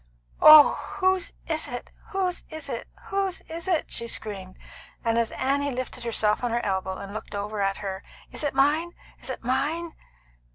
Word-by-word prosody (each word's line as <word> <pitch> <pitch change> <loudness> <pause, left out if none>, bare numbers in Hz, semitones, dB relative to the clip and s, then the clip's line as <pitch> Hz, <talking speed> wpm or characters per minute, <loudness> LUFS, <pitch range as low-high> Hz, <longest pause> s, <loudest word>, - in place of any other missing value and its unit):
"Oh, 305 -1 +9 0.2
whose 375 -1 +2
is 315 -1 0
it? 245 0 -6 0.2
Whose 370 -2 -1
is 315 0 -6
it? - - -4 0.2
Whose 390 -2 -1
is 330 +2 -8
it?" 345 -5 0
she 235 - 0
screamed; 195 -5 -3 0.5
and 230 0 +2
as 230 -1 0
Annie 280 +2 0
lifted 255 -1 -5
herself 220 -1 +1
on 245 - +1
her 235 +1 -1
elbow, 190 -1 -1
and 200 0 -8
looked 215 -1 -7
over 205 +1 -3
at 195 0 +1
her: 195 -1 -5 0.3
"Is - - -1
it 290 -2 -1
mine? 305 +6 +2 0.3
Is - - -3
it - - -5
mine?" 295 +7 -1
260 Hz, 175 wpm, -26 LUFS, 210-325 Hz, 0.5 s, Oh